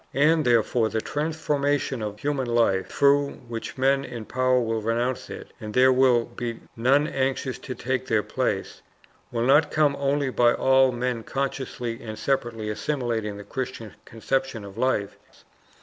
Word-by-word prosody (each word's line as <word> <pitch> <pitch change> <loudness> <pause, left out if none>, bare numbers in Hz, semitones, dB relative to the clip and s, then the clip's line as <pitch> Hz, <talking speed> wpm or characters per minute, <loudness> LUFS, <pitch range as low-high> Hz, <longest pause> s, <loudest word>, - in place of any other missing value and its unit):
And 155 +3 +4
therefore 115 -1 +2
the 110 - -1
transformation 145 -2 -1
of 105 -1 -4
human 140 -3 -1
life, 115 -5 +2
through 140 0 +3
which 115 +2 -6
men 135 +1 +2
in 120 -5 -7
power 130 +1 +2
will 115 -2 -1
renounce 120 +3 -1
it, - - -9
and 105 -1 -7
there 130 +1 +6
will 125 -2 +4
be 120 -1 -5 0.2
none 135 +5 +3
anxious 135 -1 -2
to 130 - -6
take 130 0 -2
their 110 -2 +2
place, - - -2 0.5
will 115 -1 -1
not 145 +4 +5
come 150 -2 +2
only 140 -1 0
by 120 -1 +4
all 130 0 +4
men 120 -1 -2
consciously 125 -2 -4
and 110 -2 -7
separately 120 -5 -1
assimilating 110 -2 -2
the 105 - -8
Christian 125 -4 -5
conception 130 0 -2
of 100 -1 -10
life. 105 -6 0
125 Hz, 155 wpm, -25 LUFS, 115-135 Hz, 0.5 s, there